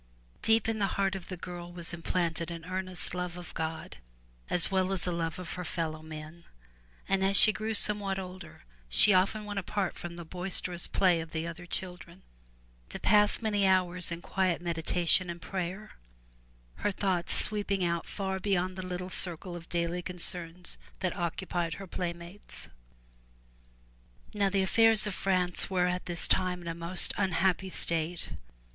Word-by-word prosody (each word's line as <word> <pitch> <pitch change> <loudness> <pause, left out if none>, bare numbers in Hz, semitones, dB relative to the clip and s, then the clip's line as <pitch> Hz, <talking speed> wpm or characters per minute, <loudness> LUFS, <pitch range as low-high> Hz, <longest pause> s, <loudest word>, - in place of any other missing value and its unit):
Deep 225 -1 +4
in 225 -1 0
the 200 - +2
heart 195 -1 +2
of 190 -2 -6
the 185 - -6
girl 175 0 -7
was 175 -1 -2
implanted 170 -1 -1
an 165 -1 -7
earnest 185 -1 -1
love 180 -1 -3
of 175 -1 -9
God 160 0 -4 0.5
as 175 +2 +4
well 190 0 +2
as 190 -2 +2
a 180 - 0
love 165 -1 -2
of 180 -2 -6
her 180 - -4
fellow 160 -2 -3
men, 155 +1 -9 0.6
and 195 0 +2
as 195 +1 +3
she 215 - +7
grew 220 +1 -2
somewhat 205 -2 +3
older 185 -1 -8 0.3
she 200 - +6
often 200 +3 +2
went 205 -1 -2
apart 200 +1 -1
from 175 0 -7
the 170 -1 -7
boisterous 180 0 0
play 180 -4 +3
of 160 0 -9
the 160 0 -2
other 170 +1 -7
children 180 0 -6 0.7
to - - -6
pass 210 +2 +4
many 205 -3 +3
hours 180 -2 +3
in 170 0 -5
quiet 185 -3 +1
meditation 175 +1 +1
and 170 0 -5
prayer, 185 +4 -4 0.9
her 205 - 0
thoughts 185 -3 0
sweeping 205 -3 +1
out 170 -1 0
far 190 -1 -3
beyond 185 -2 0
the 185 - -4
little 180 0 -4
circle 175 0 +1
of 170 -1 -9
daily 170 +1 -1
concerns 175 -1 -3 0.2
that 185 -2 0
occupied 170 -1 -2
her 195 - -7
playmates. 170 +1 -6 1.6
Now 200 -2 +2
the 195 0 +2
affairs 225 +2 +5
of 210 - -2
France 180 -1 0
were 180 -2 +2
at 180 0 -1
this 175 -1 -1
time 180 -1 +1
in - - -8
a 165 - -1
most 170 +2 0
unhappy 190 0 +2
state. 170 -1 -1
180 Hz, 165 wpm, -30 LUFS, 170-190 Hz, 1.6 s, she